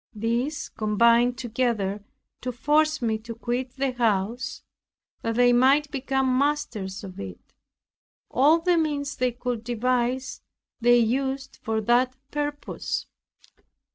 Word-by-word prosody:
These 235 Hz, +7 st, -1 dB
combined 235 Hz, +3 st, +3 dB
together 225 Hz, -5 st, -1 dB, 0.4 s
to 250 Hz, -, -3 dB
force 300 Hz, +4 st, +2 dB
me 220 Hz, -1 st, 0 dB
to 230 Hz, +1 st, -8 dB
quit 245 Hz, +2 st, -3 dB
the 270 Hz, -1 st, 0 dB
house, 230 Hz, 0 st, -1 dB, 0.6 s
that 230 Hz, 0 st, -2 dB
they 245 Hz, 0 st, +5 dB
might 275 Hz, +4 st, +4 dB
become 265 Hz, -2 st, 0 dB
masters 240 Hz, -10 st, -1 dB
of 185 Hz, -2 st, -9 dB
it. 95 Hz, -2 st, -9 dB, 0.8 s
All 290 Hz, +6 st, +5 dB
the 345 Hz, 0 st, +2 dB
means 290 Hz, -2 st, -1 dB
they 250 Hz, 0 st, +1 dB
could 245 Hz, -1 st, -4 dB
devise 245 Hz, +2 st, -1 dB, 0.4 s
they 240 Hz, 0 st, +5 dB
used 265 Hz, +3 st, -1 dB
for 220 Hz, 0 st, -1 dB
that 245 Hz, +3 st, +2 dB, 0.2 s
purpose. 290 Hz, 0 st, -3 dB
245 Hz, 120 wpm, -25 LUFS, 230-270 Hz, 0.8 s, they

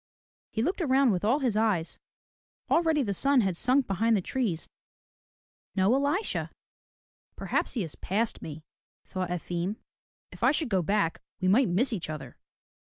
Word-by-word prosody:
He 220 Hz, -, -1 dB
looked 365 Hz, +6 st, -1 dB
around 270 Hz, -4 st, +4 dB
with 180 Hz, -1 st, -1 dB
all 250 Hz, +8 st, +2 dB
his 245 Hz, -5 st, +1 dB
eyes. 210 Hz, -7 st, 0 dB, 0.7 s
Already 320 Hz, -3 st, +3 dB
the 200 Hz, -4 st, -1 dB
sun 275 Hz, +6 st, +4 dB
had 190 Hz, -4 st, 0 dB
sunk 255 Hz, +8 st, +3 dB
behind 220 Hz, +4 st, +2 dB
the -, -, 0 dB
trees. 215 Hz, -11 st, -1 dB, 1.1 s
No 195 Hz, +4 st, +3 dB
Elisha! 285 Hz, +10 st, 0 dB, 0.9 s
'^Perhaps -, -, -1 dB
he 230 Hz, -, -1 dB
has 160 Hz, -, -6 dB
passed 215 Hz, +4 st, -2 dB
me," 155 Hz, 0 st, -8 dB, 0.4 s
thought 185 Hz, -1 st, -4 dB
Efim. 175 Hz, +2 st, -2 dB, 0.6 s
"If -, -, -13 dB
I -, -, +5 dB
should 300 Hz, -2 st, +1 dB
go 190 Hz, -4 st, +2 dB
back, 185 Hz, -1 st, 0 dB, 0.2 s
we 185 Hz, -, 0 dB
might 225 Hz, +5 st, +4 dB
miss 230 Hz, +9 st, +2 dB
each 180 Hz, -7 st, -4 dB
other. 135 Hz, -5 st, -7 dB
215 Hz, 155 wpm, -28 LUFS, 180-265 Hz, 1.1 s, I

